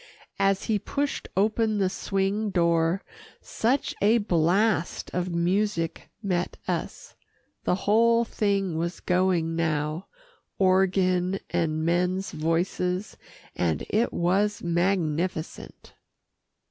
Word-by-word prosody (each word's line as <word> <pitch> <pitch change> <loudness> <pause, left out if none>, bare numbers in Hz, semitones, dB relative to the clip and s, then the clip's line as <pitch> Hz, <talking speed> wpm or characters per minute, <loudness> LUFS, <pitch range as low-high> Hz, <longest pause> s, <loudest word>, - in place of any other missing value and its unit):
As 195 0 +2
he 215 -3 0
pushed 285 +7 -3
open 215 +1 +2
the 195 -2 +2
swing 195 +3 -1
door, 170 0 +2 0.4
such 255 +5 -1
a 215 +4 +5
blast 185 0 +1
of 180 0 -1
music 170 0 -1
met 180 -3 -1
us. - - -4 0.5
The - - +2
whole 230 +3 +4
thing 195 -6 0
was 170 +2 -3
going 180 -3 +1
now 155 +1 -1 0.5
organ 185 0 +2
and 160 -2 0
men's 180 +3 0
voices, 180 +4 -1 0.4
and 80 -4 0
it 225 +3 +2
was 200 +4 +1
magnificent. 170 -1 -2
185 Hz, 100 wpm, -26 LUFS, 170-200 Hz, 0.5 s, a